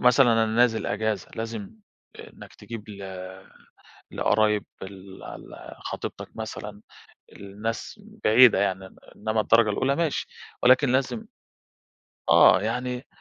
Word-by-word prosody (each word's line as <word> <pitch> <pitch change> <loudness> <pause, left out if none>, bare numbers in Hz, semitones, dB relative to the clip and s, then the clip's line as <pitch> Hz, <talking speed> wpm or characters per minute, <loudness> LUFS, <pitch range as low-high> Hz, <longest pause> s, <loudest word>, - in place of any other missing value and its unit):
مثلًا 125 -1 +6
أنا 115 0 +3
نازل 115 0 +2
أجازة، 105 -2 -2
لازِم 110 -2 -5 0.5
إنَّك - - -13
تجيب 115 -2 -9
ل 100 -1 -9 1.1
لقرايب 105 0 +1 0.2
ال 95 0 -11
ال - - -10
خطيبتَك - - -6
مثلًا، - - -7 0.5
الناس 105 - -6 0.2
بعيدة 115 -1 +7
يعني. 95 -1 -2 0.2
إنما 110 0 -1
الدرجة 115 -1 +4
الأولى 135 +7 0
ماشي، 165 -3 -1 0.4
ولكن 130 +1 +5
لازِم 135 - -1 1.0
آه - - +7
يعني، 125 +1 -3
110 Hz, 110 wpm, -25 LUFS, 105-125 Hz, 1.1 s, بعيدة